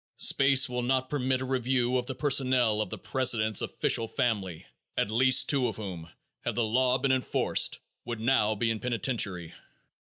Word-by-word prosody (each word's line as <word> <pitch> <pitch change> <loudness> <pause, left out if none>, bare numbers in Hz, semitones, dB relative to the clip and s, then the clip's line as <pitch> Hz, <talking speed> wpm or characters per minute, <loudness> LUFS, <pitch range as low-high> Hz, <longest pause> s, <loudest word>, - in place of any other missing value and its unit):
Space 135 0 +4
will 125 -1 -3
not 130 +1 -1
permit 130 -2 -1
a - - -3
review 130 -1 0
of 125 -1 -3
the 130 - -5
personnel 130 -6 +2
of 105 - -4
the - - -6
president's 110 -5 +1
official 115 - 0
family, 105 - -2 0.3
at 105 - 0
least 130 +3 +3
two 135 -4 +1
of - - -4
whom, 90 -6 -7 0.3
had 120 - -3
the 120 - 0
law 125 +3 +1
been 135 +1 0
enforced, 130 -1 +1 0.2
would 120 -2 -6
now 110 -2 +1
be 115 +2 0
in 110 - -3
penitentiary. 115 - -2
125 Hz, 170 wpm, -28 LUFS, 110-130 Hz, 0.3 s, Space